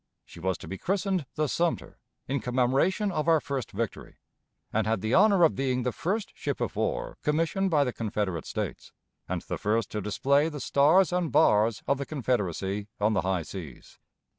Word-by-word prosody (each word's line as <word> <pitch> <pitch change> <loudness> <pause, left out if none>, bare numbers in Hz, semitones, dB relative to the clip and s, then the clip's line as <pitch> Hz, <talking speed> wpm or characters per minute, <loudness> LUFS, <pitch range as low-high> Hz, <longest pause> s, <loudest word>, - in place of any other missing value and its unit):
She - - -13
was 95 +2 -1
to - - -11
be 95 - -6
christened 190 -5 -1
the 155 - +1
Sumter, 170 +4 -1 0.3
in 140 +1 0
commemoration 135 +12 +1
of 155 -2 -2
our 165 -1 +5
first 135 -4 -4
victory, 110 +1 -4 0.6
and 110 0 +1
had 110 -3 0
the 110 +4 -1
honor 200 -2 +5
of 160 - +5
being 130 -2 -1
the 125 - 0
first 205 - -2
ship - - -3
of - - -2
war - - -2
commissioned 165 +6 +1
by 150 -4 +3
the 125 -3 -2
Confederate 105 -6 -2
States, - - -5 0.4
and - - -2
the - - -5
first 110 0 0
to 105 - -3
display 140 +9 +2
the 150 -2 -7
Stars 160 +8 +4
and 180 -3 0
Bars 110 -7 +3
of 140 -1 +1
the 140 - -4
Confederacy 105 - -1
on 105 +1 +2
the 95 - +2
high 95 -2 -1
seas. 80 -8 -10
135 Hz, 190 wpm, -28 LUFS, 105-165 Hz, 0.6 s, our